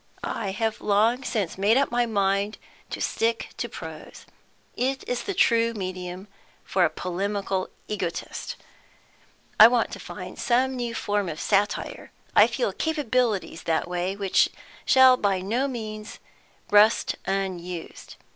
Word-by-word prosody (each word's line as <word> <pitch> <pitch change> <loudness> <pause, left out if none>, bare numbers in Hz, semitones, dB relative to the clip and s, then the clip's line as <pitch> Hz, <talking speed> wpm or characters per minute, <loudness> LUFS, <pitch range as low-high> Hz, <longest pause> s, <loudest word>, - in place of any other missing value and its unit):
I 210 -4 -3
have 220 +3 -2
long 220 +5 +2
since 205 -8 -2
made 210 +5 +4
up 275 -2 +2
my 240 0 +1
mind 200 0 0 0.3
to - - -5
stick 230 0 -1
to - - -3
prose; - - -9 0.5
it 265 +2 -2
is 245 -1 -1
the 395 - -4
true 230 -3 +3
medium 185 -1 -5 0.4
for 185 - +1
a 170 - +4
polemical 190 +3 -2 0.2
egotist. 185 -5 -4 1.0
I 215 - +12
want 240 -1 +1
to - - -7
find - - -8
some 260 +2 +2
new 240 -2 -3
form 205 -4 -1
of 155 - -6
satire; 205 0 -1 0.2
I - - +8
feel - - -1
capabilities 250 - 0
that 160 +1 +1
way 180 +2 -2
which 200 -2 +2 0.4
shall 260 -1 +7
by 200 -4 +1
no 230 +9 0
means 215 -4 -6 0.5
rust 210 +2 +5
unused. 180 -3 -4
210 Hz, 135 wpm, -25 LUFS, 190-235 Hz, 1.0 s, I